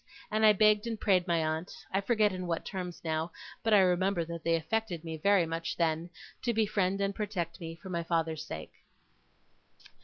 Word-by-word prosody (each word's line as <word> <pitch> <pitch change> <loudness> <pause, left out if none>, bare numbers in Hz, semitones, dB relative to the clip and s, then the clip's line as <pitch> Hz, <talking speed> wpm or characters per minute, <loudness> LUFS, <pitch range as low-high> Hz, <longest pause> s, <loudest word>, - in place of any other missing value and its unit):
And 215 +1 +1
I 215 - +9
begged 210 +1 +4
and 225 -2 -3
prayed 185 -4 +3
my 165 -2 +2
aunt 160 +3 -3 0.2
I 195 - +2
forget 215 -2 +2
in 185 -1 -4
what 165 -1 -2
terms 180 -3 -5
now, 160 +1 -1 0.3
but 225 - 0
I 205 -2 +7
remember 180 -1 +2
that 170 -1 -6
they 165 0 +3
affected 175 +1 -2
me 160 -1 -4
very 195 +2 +4
much 165 +1 -3
then 165 0 0 0.3
to 235 -1 0
befriend 200 -3 +1
and 200 0 0
protect 190 -5 -3
me, 165 0 -6
for 190 +3 -11
my 170 -1 -1
father's 165 -2 -1
sake. 80 -1 -7
180 Hz, 190 wpm, -31 LUFS, 165-205 Hz, 0.3 s, I